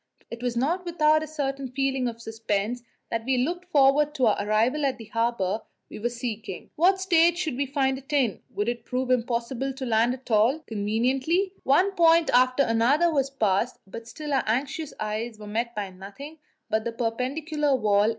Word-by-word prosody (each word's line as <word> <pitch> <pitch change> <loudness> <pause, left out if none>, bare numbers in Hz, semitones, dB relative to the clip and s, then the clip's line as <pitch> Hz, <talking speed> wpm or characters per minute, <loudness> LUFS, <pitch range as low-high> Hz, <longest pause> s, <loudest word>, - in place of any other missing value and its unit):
It 235 0 -7
was 245 -1 -2
not 330 +9 0
without 310 -3 +3
a 310 - -5
certain 275 -3 -3
feeling 265 0 -1
of 230 -1 -5
suspense 225 0 -2 0.3
that 230 -1 -1
we 260 +2 +1
looked 345 +8 -1
forward 295 -2 +3
to 260 -4 +2
our 215 - +3
arrival 225 +8 +1
at 270 -2 0
the 225 - -10
harbour 230 -3 -1 0.3
we - - -7
were 235 +3 -1
seeking 225 -5 -6
What 375 +4 +3
state 345 -2 +4
should 320 -7 -2
we 280 +2 -1
find 265 -1 0
it 270 - -15
in? 265 -8 +1
Would 205 +2 -3
it 240 0 -2
prove 255 0 -2
impossible 245 +2 -1
to 270 -1 -5
land 235 +1 +2
at 260 -1 -13
all 225 +7 +4
conveniently? 260 - 0
One 360 +9 +3
point 335 -2 +4
after 255 +2 +4
another 275 +9 +3
was 275 -2 +1
passed, 225 -2 0
but 230 +4 -9
still 300 +1 -5
our 270 - +2
anxious 275 +6 -1
eyes 215 +2 -3
were 210 - -10
met 230 +3 -3
by 200 -2 -4
nothing 205 +12 -10 0.3
but 220 0 0
the 235 0 -4
perpendicular 275 +6 -1
wall. 210 -3 +3
255 Hz, 190 wpm, -26 LUFS, 225-290 Hz, 0.3 s, state